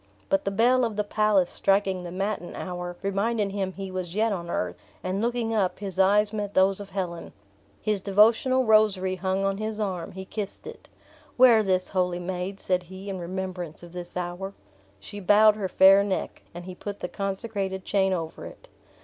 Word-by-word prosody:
But 195 0 +1
the - - +1
bell 240 +5 +3
of 225 -3 -1
the 210 - 0
palace 205 -3 +2
striking 195 -2 +1
the 175 - -6
matin 195 0 -3
hour, 180 -1 -5
reminded 200 +1 0
him 195 -1 -2
he 195 0 -6
was 185 -1 -5
yet 220 +1 +2
on 170 -3 -5
earth; 90 - -2 0.3
and 185 +2 -2
looking 235 -1 -1
up 195 -4 +1
his 195 -2 -6
eyes 205 +2 +4
met 205 -2 -4
those 190 +1 +4
of 200 -1 -8
Helen. 180 -3 -5 0.5
His 210 -2 0
devotional 225 +6 +4
rosary 205 -4 +3
hung 190 +1 -1
on 195 0 -1
his 215 0 -3
arm; 185 -5 -3
he 190 0 -7
kissed 205 0 -6
it. - - -11 0.5
"Wear 245 -3 +7
this, 185 -3 0
holy 180 -2 0
maid," 180 +2 -4
said 180 -1 0
he, 190 +3 -8
"in 190 - -5
remembrance 180 -2 -5
of 175 0 -12
this 175 0 -7
hour!" 180 +2 -4 0.4
She 205 - -8
bowed 210 +2 +5
her 200 -3 -3
fair 195 +2 +7
neck, 200 -2 -3
and 175 +1 -9
he 185 - -7
put 205 +2 -7
the - - -2
consecrated 195 -1 -3
chain 195 -1 +2
over 165 -3 -4
it. - - -14
195 Hz, 190 wpm, -26 LUFS, 185-210 Hz, 0.5 s, Wear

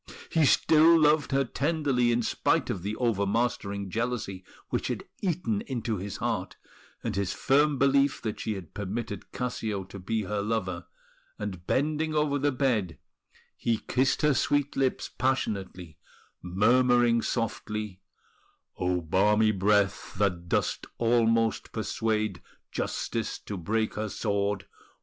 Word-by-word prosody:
He 160 -2 +4
still 160 +4 +6
loved 150 -2 +3
her 135 0 +3
tenderly, 140 -3 +1
in 120 0 +1
spite - - +1
of 90 - -4
the 105 +4 -3
over 110 -5 +1
mastering 100 -3 -1
jealousy 110 -5 -2 0.3
which - - -1
had - - -3 0.2
eaten 160 - 0
into 120 -4 -2
his 95 +1 -5
heart, - - -2 0.5
and - - -2
his 100 -1 -1
firm 145 +1 +3
belief 140 +1 +3
that 110 -2 -3
she 110 - -2
had 95 -5 -9
permitted 105 +1 -5
Cassio 110 -5 -3
to 95 +1 -10
be 110 +4 -1
her 100 +1 -2
lover; 100 -5 -2 0.5
and 95 -4 -6
bending 155 +2 0
over 150 -1 +1
the 145 +1 +2
bed 120 - 0 0.6
he 115 -1 0
kissed 130 +5 0
her 150 -1 +5
sweet 145 +1 +1
lips 135 -1 0
passionately, 100 - -2 0.4
murmuring 120 +5 +3
softly: 105 -4 -3 0.8
"O 90 -1 +1
balmy 105 +6 +3
breath, 100 0 +1
that 90 -3 0
doth - - +1 0.2
almost 115 -1 +2
persuade 110 -5 -1 0.3
Justice 115 -2 -2
to 105 - -7
break 110 +5 -1
her 110 0 -3
sword! 100 -1 -1
110 Hz, 135 wpm, -28 LUFS, 100-130 Hz, 0.8 s, still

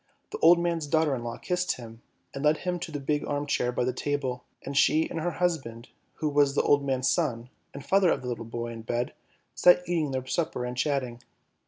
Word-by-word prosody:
The - - -5
old 170 +2 +7
man's 170 -3 -1
daughter 160 -1 +2
in 120 -3 -3
law 120 0 -5
kissed 180 0 -1
him, 115 -1 -11 0.3
and 140 - -5
led 150 +1 +4
him 180 -1 -1
to 170 -1 -6
the 145 - -4
big 145 +2 -1
arm 145 0 -1
chair 125 -3 0
by 125 - -1
the 125 +1 0
table, 130 -2 -2 0.2
and 140 - -5
she 155 +3 +4
and - - -4
her 170 +2 -1
husband, 135 -10 -2 0.3
who 155 - -2
was 145 -1 +3
the - - +3
old 145 -1 +3
man's 130 -1 0
son, 125 -7 0 0.2
and 140 - -9
father 195 -2 +4
of - - 0
the - - -5
little 120 -2 -4
boy 120 +1 -5
in 115 -1 -7
bed, 120 +2 -2 0.4
sat 180 0 +5
eating 165 -4 0
their 130 -1 -3
supper 130 -3 -2
and 125 0 -4
chatting. 125 -3 -1
140 Hz, 225 wpm, -27 LUFS, 125-160 Hz, 0.4 s, old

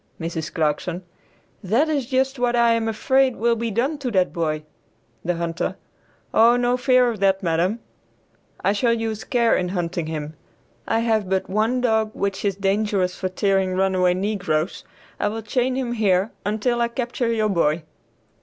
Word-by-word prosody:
Mrs. 165 -1 -4
Clarkson. 165 +4 -1 0.6
"That 230 - +2
is 285 -6 -1
just 265 0 0
what 245 -1 +1
I 235 -1 +4
am 230 -1 0
afraid 260 +3 +2
will 235 +1 +2
be 230 0 -2
done 265 +8 -1
to 265 -3 -2
that 185 -5 +1
boy." 155 -2 -1 0.6
The 175 0 0
Hunter. 170 0 -2 0.6
"O, 230 +2 +6
no 245 0 +2
fear 255 -1 +3
of 220 - -7
that, 195 0 +2
madam, 180 +7 0 0.8
I 200 - +3
shall 230 +3 +2
use 225 -2 -3
care 235 -2 +2
in 180 -1 -1
hunting 175 -3 -2
him. 155 -1 -5 0.5
I 225 0 +1
have 220 -4 +1
but 190 -1 -1
one 225 +5 +1
dog 220 -3 +2
which 200 -1 -2
is 200 -2 0
dangerous 195 -1 0
for 185 - -3
tearing 190 -1 +1
runaway 185 -1 +2
negroes; 185 -5 -1 0.4
I - - +1
will 220 +2 -4
chain 250 +4 0
him 255 -2 -2
here 200 -2 +2 0.2
until 230 +3 0
I 235 - +3
capture 235 0 -2
your 215 -2 +1
boy." 165 -4 +1
210 Hz, 170 wpm, -22 LUFS, 185-235 Hz, 0.8 s, O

